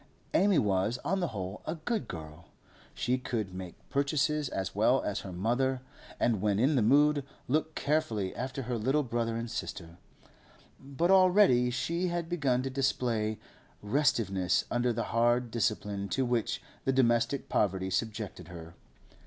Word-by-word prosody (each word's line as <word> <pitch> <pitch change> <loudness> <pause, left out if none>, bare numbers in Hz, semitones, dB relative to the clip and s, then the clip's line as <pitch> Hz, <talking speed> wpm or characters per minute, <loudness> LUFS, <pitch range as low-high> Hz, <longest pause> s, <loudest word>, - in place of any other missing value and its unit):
Amy 200 -3 +4
was, 100 +1 +1
on 195 +2 +1
the 175 - 0
whole, 95 - -5
a 160 - -1
good 205 +7 -3
girl; 80 -3 -9 0.5
she 125 +1 0
could 110 -7 -3
make 90 -2 -7 0.2
purchases 145 +1 +1
as 95 0 -3
well 115 +6 +3
as 105 0 -2
her 95 - -8
mother, 120 +8 0 0.4
and 110 -5 +1
when 105 -1 +1
in 135 +7 +3
the 125 - +3
mood, 145 +5 +4 0.2
look 155 +3 0
carefully 130 -11 0
after 130 +2 -4
her 120 -1 -2
little 135 +7 +2
brother 115 -2 -1
and 115 0 -4
sister; 85 -7 -6 0.8
but 140 +7 0
already 185 -10 +5
she 170 +8 -1
had 175 -1 -2
begun 135 -7 +1
to 135 - -2
display 120 -5 0 0.5
restiveness 105 - +1
under 120 0 +1
the 115 0 -1
hard 120 +1 +2
discipline 105 -3 -1
to 130 +8 0
which 120 -3 -1 0.2
the 135 - +2
domestic 120 0 +2
poverty 95 -2 0
subjected 105 -2 -3
her. 85 -2 -10
120 Hz, 155 wpm, -30 LUFS, 105-140 Hz, 0.8 s, already